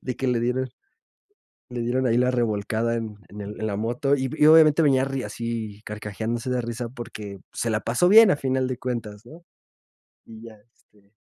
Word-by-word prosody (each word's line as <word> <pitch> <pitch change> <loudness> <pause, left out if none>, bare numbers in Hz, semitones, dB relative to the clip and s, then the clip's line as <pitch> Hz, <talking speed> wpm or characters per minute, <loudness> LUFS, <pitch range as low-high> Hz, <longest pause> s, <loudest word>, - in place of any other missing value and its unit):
de 125 - -5
que 130 - -2
le 120 -2 +1
dieron 130 +2 -1 1.0
le 125 -1 -4
dieron 125 +2 0
ahí 120 -1 +2
la 125 +1 +3
revolcada 115 -1 0
en 110 -2 -5
en 105 +1 -9
el 105 +1 -8
en 110 - -2
la 100 - -2
moto, 120 +6 0
y 130 -1 -2
y 150 - +4
obviamente 155 0 +7
venía 135 -3 +3
ri 135 -1 -3
así 110 -1 -5
carcajeándose 110 +4 -4
de 125 - 0
risa 120 0 -5
porque 105 -5 -8
se 115 - -2
la 105 - +1
pasó 125 +11 +1
bien 220 0 +8
a - - +4
final 130 -2 -1
de 130 - -3
cuentas, 115 -4 -5
¿no? 165 +7 -14 0.8
Y 110 0 -13
ya, 115 -1 -11 0.2
este 100 0 -30
120 Hz, 195 wpm, -24 LUFS, 110-130 Hz, 1.0 s, bien